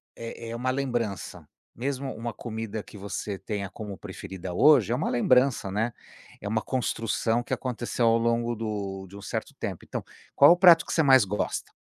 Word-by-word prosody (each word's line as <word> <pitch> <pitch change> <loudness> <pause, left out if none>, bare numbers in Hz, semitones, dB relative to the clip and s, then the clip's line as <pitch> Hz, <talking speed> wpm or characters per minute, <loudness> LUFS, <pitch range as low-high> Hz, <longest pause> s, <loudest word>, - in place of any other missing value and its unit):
é 115 0 -7
é 115 - -4
uma 130 +2 -1
lembrança, 120 -7 -3 0.3
mesmo 135 +2 -3
uma 115 +1 -5
comida 110 -2 -5
que - - -13
você 100 0 -4
tenha 100 -2 -4
como 100 +1 -8
preferida 95 -2 -7
hoje, 125 - +5
é - - +2
uma 140 - -1
lembrança, 125 -3 +3
né, 110 +4 0 0.5
é 100 - -5
uma 110 +1 0
construção 115 -2 -1
que - - -4
aconteceu 120 -1 -1
ao 115 0 +5
longo 115 0 0
do 100 -3 -4
de 100 +2 -12
um - - -10
certo 95 - -4
tempo, - - -4
então - - -5 0.3
qual 140 +3 +8
o 175 - +5
prato 175 -3 +7
que - - -4
você 160 - +3
mais 130 -6 +6
gosta? 105 +2 -3
115 Hz, 190 wpm, -27 LUFS, 105-130 Hz, 0.5 s, qual